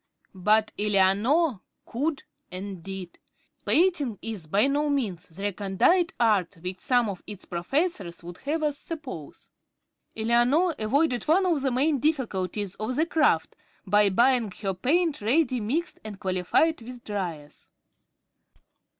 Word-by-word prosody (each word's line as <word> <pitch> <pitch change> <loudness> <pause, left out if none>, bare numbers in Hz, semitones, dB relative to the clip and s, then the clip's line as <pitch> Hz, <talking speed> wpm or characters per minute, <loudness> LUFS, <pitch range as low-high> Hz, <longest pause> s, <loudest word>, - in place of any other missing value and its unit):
But 210 +3 +2
Eleanor 210 - +2 0.2
could 285 +5 -2 0.3
and 185 0 -6
did. 190 -1 -8 0.5
Painting 315 - +2
is 210 -8 -5
by 200 +9 +3
no 290 +2 +1
means 220 - -2
the 175 +5 -8
recondite 205 - +2
art 200 -6 +2
which 180 +1 -5
some 245 -3 +2
of 195 -3 -5
its 205 -3 -8
professors 180 - -2
would 175 +1 -9
have 310 +3 -2
us 295 -1 -1
suppose. 330 -1 -8 0.7
Eleanor 240 +10 +3
avoided 245 +2 +1
one 365 +5 +3
of 335 -6 +1
the 270 - +1
main 275 +3 +1
difficulties 210 - -1
of 215 +5 -4
the 315 - +2
craft, 300 - +2 0.3
by 205 +1 +4
buying 240 +2 +3
her 195 -1 0
paint 305 - +1
ready 255 +3 +2
mixed 280 +11 -2
and 210 -3 -8
qualified 185 - +1
with 245 +1 -9
"dryers." 170 -8 -6
225 Hz, 135 wpm, -26 LUFS, 195-290 Hz, 0.7 s, by